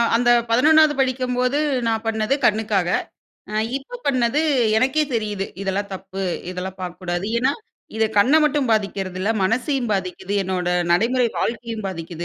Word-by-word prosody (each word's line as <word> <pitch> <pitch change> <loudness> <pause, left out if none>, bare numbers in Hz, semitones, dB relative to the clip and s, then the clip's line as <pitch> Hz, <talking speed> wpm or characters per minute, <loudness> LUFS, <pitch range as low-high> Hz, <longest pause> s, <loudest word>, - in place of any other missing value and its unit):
அந்த 240 +1 +2 0.2
11வது 305 +6 +5
படிக்கும்போது, 255 +1 0 0.3
நான் 225 -1 0
பண்ணது 220 +2 0
கண்ணுக்காக. 210 -4 +1 0.9
இப்போ 280 - -8
பண்ணது 255 +1 +2 0.4
எனக்கே 265 +7 +2
தெரியுது. 210 -3 -2 0.2
இதெல்லாம் 200 +1 -2
தப்பு, 190 +1 -7 0.3
இதெல்லாம் 185 +1 -6
பார்க்கக்கூடாது. 180 +1 -4
ஏன்னா 260 +3 +2 0.4
இது 220 - +2
கண்ண 250 +9 +5
மட்டும் 295 -3 +1
பாதிக்கிறது 195 -4 -1
இல்ல. 200 +4 0
மனசையும் 245 +5 0
பாதிக்குது. 190 0 -3
என்னோட 185 -1 -2 0.2
நடைமுறை 240 +7 +2
வாழ்க்கையும் 230 -2 -3
பாதிக்குது. 170 -2 -5
220 Hz, 125 wpm, -21 LUFS, 190-255 Hz, 0.9 s, 11வது